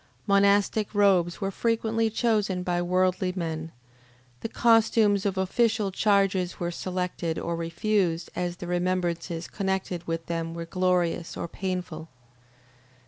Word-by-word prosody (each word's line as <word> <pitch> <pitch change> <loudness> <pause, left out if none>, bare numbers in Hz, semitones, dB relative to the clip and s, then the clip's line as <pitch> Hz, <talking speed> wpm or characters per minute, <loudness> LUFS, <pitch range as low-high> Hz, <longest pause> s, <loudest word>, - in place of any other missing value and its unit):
Monastic 200 +2 +3
robes 190 -4 +3
were 195 0 -1
frequently 225 +1 0
chosen 210 -5 0
by 175 -1 0
worldly 185 +1 +1
men, 160 -2 -4 0.7
the 225 - -5
costumes 220 -4 +3
of 195 -1 -2
official 210 +2 +1
charges 195 -3 +1
were 175 0 -2
selected 180 -2 -3
or 170 - -2
refused 170 +1 -1
as 175 -1 -2
the 175 - -8
remembrances 175 -1 -1
connected 190 -3 -3
with 165 0 -3
them 165 -1 -3
were 170 0 -5
glorious 180 -1 0
or - - -3
painful. 180 -3 -5
185 Hz, 125 wpm, -26 LUFS, 170-200 Hz, 0.7 s, Monastic